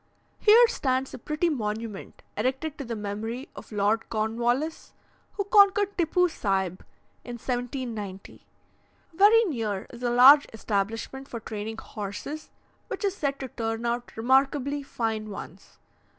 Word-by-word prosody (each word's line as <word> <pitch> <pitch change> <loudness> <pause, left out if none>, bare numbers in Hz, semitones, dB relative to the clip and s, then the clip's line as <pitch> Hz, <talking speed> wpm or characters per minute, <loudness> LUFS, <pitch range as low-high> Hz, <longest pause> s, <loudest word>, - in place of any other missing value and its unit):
Here 460 +3 +7
stands 265 - -1
a - - -7
pretty 305 +7 -1
monument 220 -7 -4
erected 265 +7 -1
to - - -3
the 235 -2 -4
memory 220 +5 -5
of - - -11
Lord 210 +2 0
Cornwallis, 240 +8 -1 0.4
who 400 - -2
conquered 405 0 +4
Tippoo 360 +1 +2
Saib 190 - -2 0.4
in 245 - -7
1790. 240 -5 -5 0.7
Very 415 +6 +6
near 220 - -2
is 240 - -10
a 245 - 0
large 265 +4 +8
establishment 225 +5 -3
for 235 - -6
training 220 0 -6
horses, 215 +10 -6 0.4
which - - -4
is 395 -1 0
said 280 -6 -2
to 265 - -3
turn 225 0 -3
out 240 0 -3
remarkably 270 +4 +2
fine 225 -5 -3
ones. 200 - -10
245 Hz, 135 wpm, -27 LUFS, 220-290 Hz, 0.7 s, large